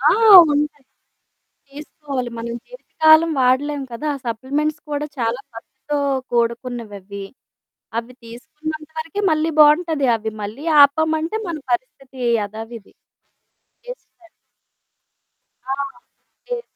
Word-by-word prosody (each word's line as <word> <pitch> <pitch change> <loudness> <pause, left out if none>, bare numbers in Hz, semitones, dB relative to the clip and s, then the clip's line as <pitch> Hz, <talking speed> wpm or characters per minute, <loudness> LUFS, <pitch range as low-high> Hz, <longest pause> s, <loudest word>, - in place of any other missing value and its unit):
ఆ! 285 - +4 0.4
ఉంటాయి. 290 -1 -1 0.9
తీసుకోవాలి. 280 -3 -6
మనం 235 0 -5
జీవితకాలం 325 -10 +3
వాడలేం 275 +3 +1
కదా! 235 +6 -6
ఆ - - -6
సప్లిమెంట్స్ 285 +7 -2
కూడా 290 0 -2
చాలా 235 +1 -1
ఖర్చుతో 290 +5 -6 0.4
కూడుకున్నవ్వవ్వి. 230 -5 -3 0.7
అవ్వి 235 +2 -6
తీసుకున్నంత 305 +7 -8
వరకే 330 +5 -4
మళ్ళీ 315 +1 +1
బావుంటది. 300 -1 +4
అవి 220 0 -5
మళ్ళీ 215 +9 -7 0.2
ఆపామంటే 315 +5 +2
మన 335 - -3 0.2
పరిస్థితి 260 +2 -4 0.2
యథావిధి. 220 +1 -8 0.9
వేస్టే - - -12 1.4
ఆ! - - +1 0.8
యే 485 -1 -2
280 Hz, 95 wpm, -20 LUFS, 235-310 Hz, 1.4 s, ఆ